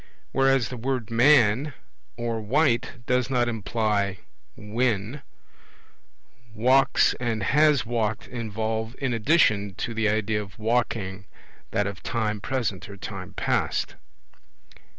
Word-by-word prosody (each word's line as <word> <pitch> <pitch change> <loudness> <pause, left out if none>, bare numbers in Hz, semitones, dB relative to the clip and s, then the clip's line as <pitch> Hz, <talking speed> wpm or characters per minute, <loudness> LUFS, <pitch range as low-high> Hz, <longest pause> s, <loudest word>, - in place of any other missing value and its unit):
Whereas 135 -3 +2
the 125 - -6
word 125 -2 -3
'man' 125 +2 +4 0.4
or 115 -1 -2
'white' 120 0 0
does 125 +1 +1
not 125 -2 +1
imply 105 -3 -1 0.4
when, 110 +3 -1 1.3
'walks' 130 +5 +4
and 115 -4 -1
'has 150 +2 +3
walked' 110 -2 -2
involve 110 0 -3
in 135 -3 -1
addition 105 - +2
to 120 - -4
the 110 -1 +1
idea 105 0 0
of 95 -2 -11
walking 110 -4 -1 0.4
that 105 - 0
of 100 -1 -5
time 105 -3 -2
present 110 -6 -2
or 100 - -9
time - - -7
past. - - -1
115 Hz, 115 wpm, -25 LUFS, 105-125 Hz, 1.3 s, man